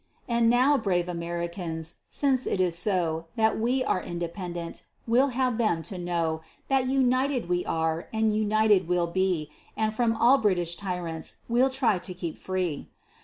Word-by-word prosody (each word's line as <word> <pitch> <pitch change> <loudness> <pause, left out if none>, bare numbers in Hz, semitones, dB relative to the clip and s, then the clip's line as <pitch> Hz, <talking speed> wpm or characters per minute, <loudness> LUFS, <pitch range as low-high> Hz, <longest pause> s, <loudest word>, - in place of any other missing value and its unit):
And 235 -1 +3
now, 260 +4 +4
brave 180 -5 0
Americans, 170 -1 -4
since 265 -3 +1
it - - 0
is 180 -2 +2
so, 170 -3 0
That 220 -2 +2
we 250 +4 +1
are 185 - 0
independent, 170 0 -5 0.2
we'll 245 +4 +4
have 250 -2 0
them 175 -8 +1
to 180 +3 -5
know 170 -2 -1 0.3
That 265 -1 +2
united 260 -2 +1
we 180 0 0
are, 160 +1 -1
and 220 -1 +1
united 215 -3 +3
we'll 180 -1 +2
be, 170 -3 0 0.3
And 220 -1 0
from 225 0 +1
all 250 +5 +5
British 175 -5 +1
tyrants 175 -4 -4
we'll 245 +3 +3
try 260 -8 +1
to 180 - -6
keep 170 -3 -5
free. 185 -5 -3
190 Hz, 160 wpm, -27 LUFS, 170-235 Hz, 0.3 s, all